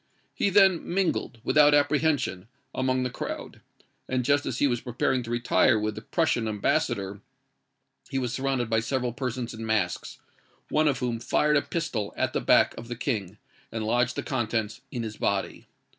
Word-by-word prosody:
He - - +1
then 190 -3 +5
mingled, 180 -9 0
without 145 -1 +5
apprehension, 145 - +1 0.3
among 130 0 0
the 125 - -2
crowd; - - -6 0.5
and 125 -1 0
just 145 +1 +2
as 125 - -2
he - - +3
was 120 -4 +1
preparing 125 +1 0
to 115 - -8
retire 120 0 +3
with 105 0 -1
the 110 - -8
Prussian 120 -3 0
ambassador, 100 -1 -1 0.9
he 135 - -2
was 125 -2 -1
surrounded 130 -2 -1
by 110 -1 +2
several 125 +1 -1
persons 125 -2 -4
in 110 0 -7
masks, 105 -6 -1 0.5
one 155 0 +2
of 140 -3 +2
whom 120 -2 -2
fired 150 +5 +2
a 145 - +4
pistol 150 -14 -3
at - - 0
the - - 0
back - - +4
of 115 - -9
the 120 - -5
King, 105 -6 -3 0.3
and 110 -1 -3
lodged 120 +2 +1
the - - -3
contents 110 -3 -2
in 120 -3 -4
his 110 -1 -6
body. 100 -1 -2
120 Hz, 175 wpm, -27 LUFS, 110-140 Hz, 0.9 s, then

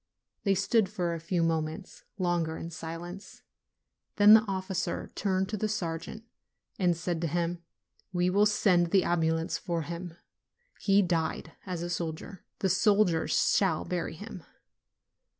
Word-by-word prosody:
They 195 -1 +3
stood 200 +1 +2
for 180 -4 -2
a 165 - -4
few 170 +1 -1
moments 160 +3 -3
longer 175 -4 0
in 165 - -7
silence; 170 +4 -8 0.7
then 205 +1 +8
the 220 - +9
officer 190 -1 -3
turned 190 -1 0
to 215 - -2
the 215 +2 -1
sergeant 175 +1 -4 0.6
and 175 -3 +2
said 170 -1 -2
to 170 - 0
him, 170 +1 -1 0.5
'We 180 0 +1
will 205 +2 +4
send 185 -4 +3
the 190 +1 +4
ambulance 165 -1 0
for 170 -2 -2
him: 170 +1 -7 0.6
he 200 0 +4
died 165 -2 -1 0.2
as 175 -2 -3
a 175 - -4
soldier; 170 +3 -5 0.2
the 195 - +2
soldiers 200 -3 +3 0.2
shall 195 -2 +1
bury 175 -2 -3
him." 190 -1 -9
175 Hz, 145 wpm, -29 LUFS, 165-195 Hz, 0.7 s, the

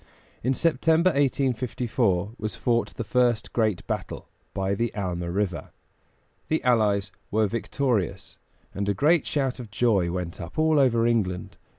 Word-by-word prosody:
In 130 +3 +1
September, 165 +3 +3
1854, 125 - 0
was 110 0 -3
fought 120 -1 0
the - - -3
first 120 -1 +1
great 110 -7 0
battle, - - -5 0.2
by 95 0 -1
the 115 +3 -1
Alma 90 -4 -3
River. 95 -1 -2 0.8
The 160 - 0
allies 105 -5 +2 0.2
were 110 +1 +2
victorious, 115 - -2 0.3
and 100 +1 -2
a 100 - +1
great 155 - +3
shout 135 -3 -1
of 120 -3 -8
joy 105 -5 +2
went 90 0 -4
up 85 0 -9
all 155 -1 +3
over 120 -4 +3
England. 100 -7 0
115 Hz, 145 wpm, -25 LUFS, 100-130 Hz, 0.8 s, September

